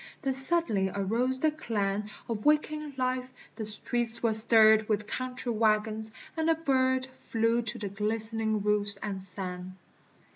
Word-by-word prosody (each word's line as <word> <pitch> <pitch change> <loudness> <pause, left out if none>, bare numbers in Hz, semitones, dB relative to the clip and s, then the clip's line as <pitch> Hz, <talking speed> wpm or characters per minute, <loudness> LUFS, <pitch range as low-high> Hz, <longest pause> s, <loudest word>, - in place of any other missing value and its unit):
Then 270 -1 0
suddenly 265 - 0
arose 230 +7 -1
the 310 - +3
clang 210 -8 -2 0.2
Of 220 -3 -4
waking 300 -1 +1
life; 255 0 -1 0.2
the 220 - -5
streets 235 +2 -4
were 230 -2 +3
stirred 220 -1 +6
With 210 -1 0
country 250 +1 -4
wagons: 220 0 0 0.2
and 320 0 0
a 325 - +4
bird 260 -4 +1 0.2
Flew 230 +1 +2
to 225 -2 -5
the 205 - -4
glistening 220 +1 -1
roofs 205 -1 +2
and 195 -1 -5
sang. 185 -1 -2
225 Hz, 145 wpm, -29 LUFS, 210-255 Hz, 0.2 s, stirred